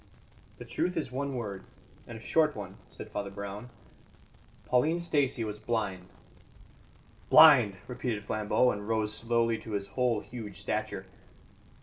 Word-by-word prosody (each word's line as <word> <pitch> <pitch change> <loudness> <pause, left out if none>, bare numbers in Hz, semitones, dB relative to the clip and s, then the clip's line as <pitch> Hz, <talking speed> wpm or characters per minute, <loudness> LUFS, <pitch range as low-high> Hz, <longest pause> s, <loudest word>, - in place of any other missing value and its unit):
"The - - -9
truth 180 -1 -2
is 150 -6 -2
one 140 +1 -3
word, 105 -5 -5 0.4
and 115 - -7
a - - -12
short 155 +4 +2
one," 100 -2 -7
said - - -10
Father 100 -1 -3
Brown. 100 +3 -7 1.0
"Pauline 155 +7 +2
Stacey 145 -8 0
was 105 -1 -5
blind." 105 -5 -2 1.2
"Blind!" 125 -11 +8
repeated 120 -4 -3
Flambeau, 110 +4 +2
and 105 0 -6
rose 110 -1 0
slowly 115 0 +1
to 110 0 -8
his 100 -1 -3
whole 120 -2 +1
huge 110 -5 -8
stature. - - -3
115 Hz, 135 wpm, -30 LUFS, 105-125 Hz, 1.2 s, Blind